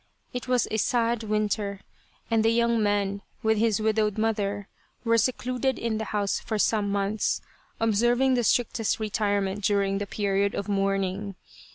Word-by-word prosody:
It 250 +1 -5
was 250 -2 +2
a 220 - 0
sad 235 +1 +1
winter, 210 -2 -1 0.5
and 225 -1 +3
the 225 - +4
young 235 0 +2
man 200 -1 0 0.2
with 220 -1 +2
his 220 -2 +2
widowed 215 -1 +1
mother, 205 -2 -1 0.4
were 230 -1 +3
secluded 255 +3 0
in 225 -2 -2
the 220 - -3
house 205 -1 -1
for 220 - -3
some 210 -1 +1
months, 200 +1 0 0.4
observing 240 +4 +3
the 245 -1 +2
strictest 230 -1 +1
retirement 205 -2 -1
during 195 -1 +1
the 205 - -4
period 200 0 0
of 200 - -3
mourning. 195 0 -1
215 Hz, 155 wpm, -26 LUFS, 200-230 Hz, 0.5 s, the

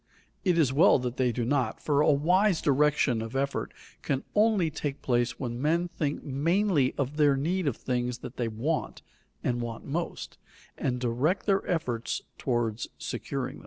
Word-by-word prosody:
It 180 -3 +2
is 140 -6 +3
well 165 +8 +6
that 125 -1 -4
they 125 -2 +2
do 120 0 -2
not, 125 -3 0
for 145 -1 +1
a - - +4
wise 180 +6 +3
direction 140 -4 +2
of 115 +3 -6
effort 140 +1 -1 0.3
can 135 -1 -1
only 210 -6 +3
take 145 -2 -4
place 120 -1 0
when 120 -1 -4
men 170 +4 +1
think 150 -4 -3
mainly 150 +1 +1
of 140 +2 -2
their 145 -3 +4
need 170 +4 0
of 135 - 0
things 125 -1 -2
that 125 - -8
they 120 - 0
want, 125 +9 -2 0.4
and 120 -1 0
want 115 -1 -5
most, 170 +5 -4 0.4
and 125 -2 -1
direct 130 +10 0
their 195 -1 +2
efforts 125 -9 -1 0.2
toward 120 -3 -1 0.2
securing - - -4
them. - - -12
140 Hz, 170 wpm, -28 LUFS, 125-165 Hz, 0.4 s, well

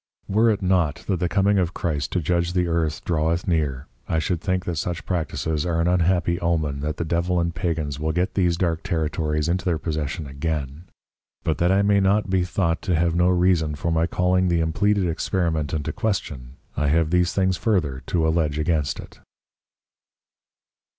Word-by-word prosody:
Were 110 +4 +3
it 105 -2 0
not 85 -5 +1
that 95 -4 0
the 90 -1 0
coming 100 +2 +2
of 90 -1 -1
Christ 75 -4 -2
to 90 - +1
judge 85 +2 0
the 90 -1 +2
Earth 80 -2 -1
draweth 85 +2 0
near, 75 -6 0 0.2
I 80 - +1
should 80 +2 -1
think 95 -2 -1
that 85 -2 -3
such 85 +1 -3
Practices 80 -3 -2
are 85 -2 -1
an 85 - +2
unhappy 90 0 +2
Omen 80 -5 0
that 75 +2 -3
the 85 - -2
Devil 85 +2 0
and 85 0 -1
Pagans 80 -5 -2
will 80 +1 -1
get 90 +5 -1
these 90 -3 +1
dark 85 -2 0
Territories 80 -3 -1
into 90 +3 0
their 85 -4 +1
Possession 75 -1 -3
again: 70 +2 -4 0.6
But 80 - -1
that 85 +1 +3
I 100 +1 +3
may 100 0 +4
not 100 +1 +2
be 95 -1 +2
thought 85 -2 -1
to 90 - 0
have 85 +1 +1
no 90 +1 +3
reason 90 -4 +2
for 85 +3 -2
my 80 0 +2
calling 90 +1 +1
the 85 -1 +2
impleaded 90 +5 +1
Experiment 80 -3 -1
into 75 -1 -2
Question, 70 - -3 0.2
I 75 +1 0
have 80 +2 +2
these 90 -1 +3
things 95 0 +1
further 80 - 0
to 80 -2 +1
alledge 80 -2 +1
against 75 -2 0
it. - - -11
85 Hz, 190 wpm, -23 LUFS, 80-90 Hz, 0.6 s, may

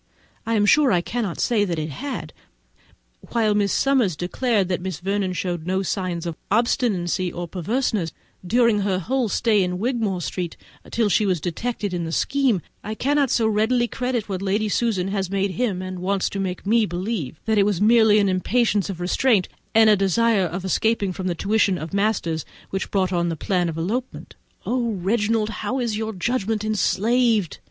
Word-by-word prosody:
I 230 - +1
am 205 -1 +3
sure 280 +4 +5
I 180 -3 +3
cannot 215 -2 -3
say 225 -4 +2
that 175 -5 -2
it 155 0 -3
had, 280 - -5 0.9
but - - -16
while 220 -2 +3
Miss 205 -1 +1
Summers 255 - +2
declares 205 - 0
that 180 -1 -2
Miss 185 -3 -4
Vernon 195 0 -1
showed 175 -2 -3
no 190 +1 0
signs 180 -3 -2
of 170 -2 -3
obstinacy 195 -5 +1
or 175 0 -5
perverseness 190 - -1 0.3
during 230 +2 +3
her 195 -2 0
whole 250 +5 -1
stay 215 0 +2
in 180 0 -2
Wigmore 220 -3 -1
Street, 175 0 -4 0.3
till 225 -2 +1
she 205 +1 +2
was 185 -3 +1
detected 205 +4 -3
in 175 -1 -2
this 165 - -1
scheme, 265 - +1 0.2
I 215 +1 -4
cannot 280 +2 +1
so 230 -1 +2
readily 220 +3 +2
credit 245 -2 -2
what 190 -2 -3
Lady 205 +2 0
Susan 200 -4 0
has 195 -2 -2
made 195 0 0
him, 195 -4 -1
and 185 -1 -6
wants 195 +1 0
to 200 - -4
make 185 -1 -3
me 220 +1 +3
believe, 175 - -4
that 220 -1 +2
it 200 - +4
was 200 -5 0
merely 220 0 +5
an 205 -1 +3
impatience 205 +2 +1
of 185 -3 -5
restraint 195 +2 +2 0.3
and 225 0 +7
a 215 - +6
desire 200 +1 +2
of 180 +3 -5
escaping 200 0 +1
from 185 +1 -4
the 175 - -1
tuition 200 0 +1
of 160 +2 -7
masters 200 -6 0 0.3
which 195 - -3
brought 190 -2 0
on 170 -1 +1
the 165 - -2
plan 175 +2 0
of 160 - -5
an 165 - -2
elopement. 245 +8 -4 0.3
O 240 -2 0
Reginald, 210 +3 0
how 230 +6 -2
is 235 -4 -1
your 220 +1 -3
judgment 215 +1 -1
enslaved! 215 - +1
200 Hz, 190 wpm, -23 LUFS, 180-230 Hz, 0.9 s, and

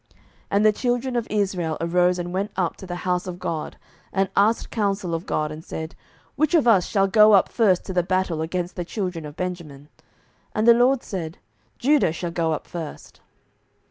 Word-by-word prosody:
07:020:018 - - -33 0.3
And 205 +2 +2
the 215 - +7
children 245 +3 -1
of 235 -1 -1
Israel 190 -6 -1
arose, 180 +2 +2
and 175 0 -4
went 195 +2 -1
up 180 -3 -1
to 190 - -10
the 175 - -4
house 180 0 0
of 180 -1 -5
God, 170 -4 -4 0.3
and 195 0 0
asked 215 +3 +2
counsel 200 -5 -1
of 165 +1 -4
God, 155 0 -1
and 155 +1 -8
said, 160 0 -6 0.4
Which 305 +3 +2
of 300 -7 +3
us 195 -6 +5
shall 195 -1 +2
go 210 +2 +6
up 195 - +5
first 200 -6 +2
to 190 - -5
the 180 - +3
battle 180 -2 -1
against 175 +2 -3
the 180 - -3
children 180 -4 -4
of 145 - -11
Benjamin? 165 -6 -6 0.7
And 215 +2 +1
the 235 - +10
LORD 245 +2 +3
said, 170 -5 -5 0.4
Judah 275 - +3
shall 170 +1 -4
go 165 -1 0
up 155 - -3
first. 165 -4 -8
185 Hz, 200 wpm, -23 LUFS, 170-210 Hz, 0.7 s, the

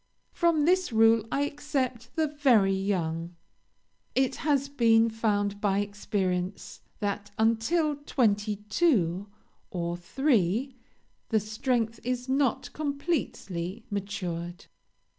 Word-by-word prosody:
From 335 -4 +2
this 365 -1 +2
rule 225 0 +4
I 280 - +1
except 270 -5 -3
the 320 - +2
very 255 -10 +3
young. 175 -3 -2 0.8
It 265 0 +1
has 280 -2 +1
been 230 -4 +4
found 205 -2 0
by 200 -2 +2
experience 200 -2 -2 0.2
that 205 0 -2
until 230 +8 +2
twenty 215 -7 +1
two 205 - +2 0.4
or 170 -1 -2
three 235 - +1 0.6
the 220 - +3
strength 225 +2 -1
is 250 +1 -2
not 265 -2 0
completely 265 - -3
matured. 180 -4 -4
225 Hz, 105 wpm, -28 LUFS, 200-275 Hz, 0.8 s, rule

